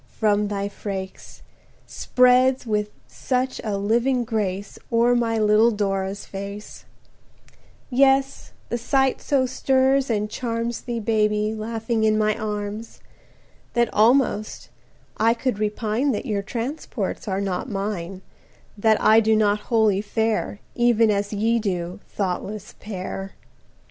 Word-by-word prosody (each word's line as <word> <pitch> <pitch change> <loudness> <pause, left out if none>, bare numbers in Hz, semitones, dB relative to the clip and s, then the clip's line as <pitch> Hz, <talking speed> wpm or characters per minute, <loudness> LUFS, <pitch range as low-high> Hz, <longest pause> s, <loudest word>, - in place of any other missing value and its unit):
from 210 -1 +2
thy 200 -1 -2
freaks,– 195 -2 -7 0.4
Spreads 255 +1 +3
with 210 -2 -1 0.2
such 255 0 -2
a 210 -3 -2
living 240 +5 +1
grace 205 -4 -3
O'er 235 +1 +4
my 230 -2 +1
little 215 +1 +4
Dora's 195 -2 -2
face; 200 +2 -8 1.1
Yes, 270 +1 +2 0.2
the 240 - -2
sight 265 +2 +1
so 270 -3 +1
stirs 265 +1 +2
and 210 -2 0
charms 230 +1 -3
Thee, 240 -2 -4
Baby, 210 -1 +1
laughing 225 +1 -2
in 215 0 +3
my 215 0 +2
arms, 210 +1 -5 0.7
That 235 -1 +1
almost 220 - +2 0.5
I 225 +2 +3
could 245 -3 -2
repine 215 +5 0
That - - -3
your 210 -5 -1
transports 230 -1 -4
are 190 -1 -1
not 195 +3 -3
mine, 195 -3 -4 0.5
That 220 +1 +3
I 220 +1 +6
do 220 0 +3
not 210 -1 +2
wholly 220 -4 +3
fare 220 -1 -1
Even 235 -2 +3
as 200 0 -1
ye 225 +3 +1
do, 180 -4 -3
thoughtless 195 +1 -4
pair! 195 -1 -6
215 Hz, 125 wpm, -23 LUFS, 205-235 Hz, 1.1 s, I